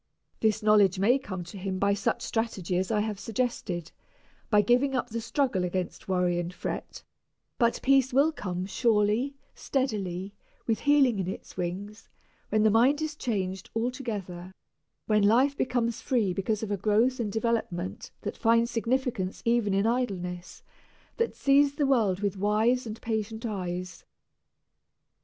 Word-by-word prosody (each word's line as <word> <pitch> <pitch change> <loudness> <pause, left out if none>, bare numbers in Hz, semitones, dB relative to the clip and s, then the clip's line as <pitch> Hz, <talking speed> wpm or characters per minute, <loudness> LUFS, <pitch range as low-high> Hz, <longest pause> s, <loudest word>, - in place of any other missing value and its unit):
This 220 0 +1
knowledge 205 -3 +5
may 235 +8 +3
come 190 -8 -6
to 175 +3 -10
him 190 0 -3
by 200 +1 +2
such 200 0 -1
strategy 215 -6 -2
as 185 +1 0
I 215 -2 +1
have 210 -2 -3
suggested 200 -8 -3 0.6
by 210 -2 +4
giving 250 +5 +2
up 255 - -1
the 230 +1 -3
struggle 230 -4 0
against 180 0 -3
worry 180 -2 +1
and 175 0 -3
fret; - - -6 0.6
but 235 -2 +2
peace 270 -1 +4
will 280 +5 +4
come 185 - -4
surely, 220 +5 +1 0.2
steadily, 200 -8 -2 0.3
"with 225 -2 0
healing 275 -7 +4
in 185 - -2
its 190 - -7
wings," 190 +4 -5 0.4
when 215 0 +2
the 220 - +5
mind 250 +7 +4
is 310 -1 -3
changed 195 -9 -3
altogether, 210 -7 -4 0.5
when 210 -1 +3
life 250 +7 +4
becomes 240 -4 -1
free 220 -8 +1
because 205 +4 -1
of 210 - -3
a 205 - 0
growth 220 +6 +2
and 215 -3 -1
development 220 -5 -2
that - - -4
finds 230 +1 +2
significance 235 -5 -1
even 235 -3 +2
in 195 +2 +2
idleness, 185 -7 -2 0.5
that 465 0 0
sees 280 0 +3
the 290 - +1
world 220 -8 +2
with 205 -1 -1
wise 220 +5 +2
and 220 0 -6
patient 220 +1 -3
eyes. 180 -4 -4
215 Hz, 150 wpm, -28 LUFS, 190-245 Hz, 0.6 s, knowledge